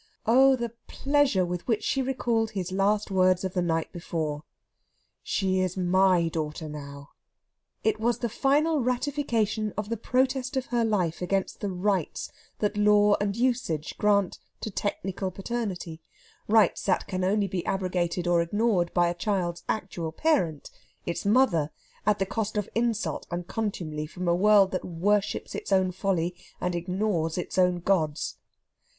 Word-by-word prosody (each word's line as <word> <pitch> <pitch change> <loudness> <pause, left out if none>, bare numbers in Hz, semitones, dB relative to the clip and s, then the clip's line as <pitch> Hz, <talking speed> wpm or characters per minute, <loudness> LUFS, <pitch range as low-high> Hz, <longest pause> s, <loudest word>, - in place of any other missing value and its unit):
Oh, 265 +4 +6
the 235 -2 -3 0.2
pleasure 275 -9 +2
with 175 0 -5
which 220 -3 +1
she 270 - +1
recalled 240 -4 0
his 185 -3 -4
last 200 +2 +1
words 185 -1 +3
of 185 -1 -3
the 180 - +1
night 165 -2 -1
before: 160 -4 -3 0.8
"She 190 -1 0
is 185 0 -1
my 185 -1 +3
daughter 155 0 -4
now!" 140 -1 -8 0.7
It 220 - +1
was 235 +1 +1
the 240 - -1
final 290 +7 +2
ratification 240 -5 0
of 210 0 -3
the 230 - -1
protest 260 +3 0
of 260 - -1
her 240 -1 0
life 185 -8 0
against 190 +1 -1
the 205 - -2
"rights" 185 -2 -1 0.3
that 210 0 -1
Law 210 0 +5
and 200 -1 0
Usage 235 - -1
grant 200 -3 +2 0.2
to 215 - -4
technical 195 -1 -3
paternity; 190 -5 -4 0.5
rights 215 -3 +4
that 190 - +1
can 185 0 -3
only 200 +2 +2
be 185 -3 -3
abrogated 180 -2 -1
or 175 -1 +3
ignored 190 0 +1
by 175 0 +4
a 170 - 0
child's 175 -2 -2
actual 180 -6 -3
parent 175 - 0 0.3
its 170 +3 -3
mother 200 - +3 0.4
at 210 -1 +4
the 195 - 0
cost 210 +2 -3
of 210 - -1
insult 230 -1 -1
and 175 0 -4
contumely 170 -9 -3
from 180 +3 -5
a 170 - +4
world 200 +1 +5
that 185 - -2
worships 195 +4 0
its - - -6
own 190 -1 +3
folly 180 -2 -1 0.3
and 180 0 -1
ignores 175 -1 -1
its 180 +1 -2
own 180 -1 +3
gods. 160 -5 0
195 Hz, 155 wpm, -27 LUFS, 175-220 Hz, 0.8 s, Oh